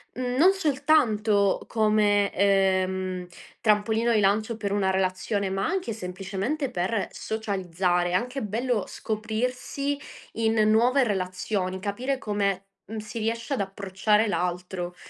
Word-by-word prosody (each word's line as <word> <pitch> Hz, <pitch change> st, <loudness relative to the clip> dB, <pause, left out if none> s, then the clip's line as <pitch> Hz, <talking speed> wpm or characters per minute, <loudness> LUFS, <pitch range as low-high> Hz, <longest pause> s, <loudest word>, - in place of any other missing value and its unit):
non 255 Hz, +8 st, +3 dB
soltanto 230 Hz, -, +2 dB
come, 210 Hz, -2 st, +2 dB
ehm, 190 Hz, -2 st, +1 dB, 0.3 s
trampolino 220 Hz, +2 st, +2 dB
di 220 Hz, -, +4 dB
lancio 215 Hz, +3 st, +1 dB
per 205 Hz, -2 st, -3 dB
una 200 Hz, -2 st, +1 dB
relazione, 190 Hz, +1 st, 0 dB
ma 195 Hz, +1 st, -1 dB
anche 355 Hz, -, -1 dB
semplicemente 195 Hz, +9 st, -3 dB
per 195 Hz, 0 st, -1 dB
socializzare. 185 Hz, -4 st, -1 dB
È -, -, -3 dB
anche 250 Hz, +8 st, -1 dB
bello 225 Hz, +1 st, -1 dB
scoprirsi 250 Hz, +6 st, -2 dB, 0.4 s
in 225 Hz, 0 st, +1 dB
nuove 245 Hz, +5 st, +4 dB
relazioni, 185 Hz, -1 st, -2 dB
capire 240 Hz, +8 st, -2 dB
come 200 Hz, -5 st, -1 dB, 0.2 s
m 220 Hz, -, -5 dB
si 215 Hz, +2 st, -6 dB
riesce 230 Hz, +5 st, -2 dB
ad 260 Hz, -, 0 dB
approcciare 200 Hz, +2 st, +1 dB
l'altro. 180 Hz, -1 st, -2 dB
210 Hz, 120 wpm, -26 LUFS, 190-230 Hz, 0.4 s, di